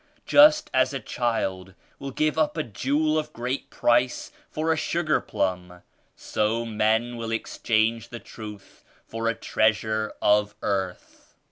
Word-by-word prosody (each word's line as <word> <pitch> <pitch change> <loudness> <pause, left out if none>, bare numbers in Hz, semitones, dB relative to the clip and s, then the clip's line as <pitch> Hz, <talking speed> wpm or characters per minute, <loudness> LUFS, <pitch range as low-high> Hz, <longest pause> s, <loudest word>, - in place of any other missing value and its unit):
Just 305 +1 +6
as 130 +1 +2
a - - -2
child 95 -6 -2 0.2
will 140 - -5
give 155 +3 0
up 155 0 +1
a 155 - 0
jewel 145 +7 0
of 155 0 -5
great 125 +3 -4
price 120 +1 +1 0.2
for 160 +1 0
a - - -1
sugar 160 0 0
plum, 90 -2 -3 0.3
so 110 +2 -1
men 110 +2 0
will 115 -1 -4
ex 115 - -4
change 115 +1 +1
the 120 - -7
Truth 105 -3 -11 0.2
for 115 0 -4
a 115 - +1
treasure 110 0 0
of 105 0 +2
earth. 95 -3 -4
115 Hz, 145 wpm, -25 LUFS, 105-140 Hz, 0.3 s, Just